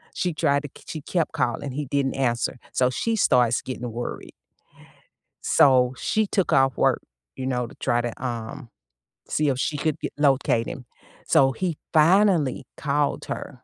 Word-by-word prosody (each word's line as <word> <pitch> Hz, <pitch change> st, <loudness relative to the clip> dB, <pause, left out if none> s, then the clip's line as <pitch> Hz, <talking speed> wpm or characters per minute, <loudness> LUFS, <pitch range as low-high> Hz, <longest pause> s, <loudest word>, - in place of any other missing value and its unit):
She 180 Hz, -3 st, -1 dB
tried 140 Hz, -1 st, +1 dB
to 145 Hz, -, -6 dB
k -, -, -17 dB
she 155 Hz, -, -6 dB
kept 165 Hz, +2 st, -1 dB
calling. 130 Hz, +3 st, -1 dB
He 145 Hz, +1 st, -3 dB
didn't 140 Hz, 0 st, -1 dB
answer. 125 Hz, -2 st, 0 dB, 0.2 s
So 125 Hz, 0 st, +3 dB
she 225 Hz, -, -1 dB
starts 125 Hz, -, +3 dB
getting 125 Hz, -2 st, -5 dB
worried. 120 Hz, +1 st, -6 dB, 1.1 s
So 130 Hz, -2 st, +4 dB
she 220 Hz, 0 st, 0 dB
took 195 Hz, -2 st, 0 dB
off 135 Hz, -1 st, +3 dB
work, -, -, +2 dB, 0.3 s
you 130 Hz, -, -5 dB
know, 125 Hz, -2 st, -1 dB
to -, -, -14 dB
try 120 Hz, -, 0 dB
to, 120 Hz, +2 st, -5 dB
um, 120 Hz, +1 st, -5 dB, 0.6 s
see 150 Hz, -1 st, +1 dB
if 130 Hz, -1 st, -1 dB
she 150 Hz, +2 st, -1 dB
could 155 Hz, 0 st, -1 dB
g -, -, -2 dB
locate 135 Hz, -5 st, +2 dB
him. 125 Hz, -, -7 dB, 0.4 s
So 135 Hz, -1 st, +5 dB
he 175 Hz, 0 st, -3 dB, 0.2 s
finally 165 Hz, -4 st, +4 dB
called 145 Hz, 0 st, -1 dB
her, 130 Hz, -3 st, -7 dB
135 Hz, 165 wpm, -24 LUFS, 125-150 Hz, 1.1 s, So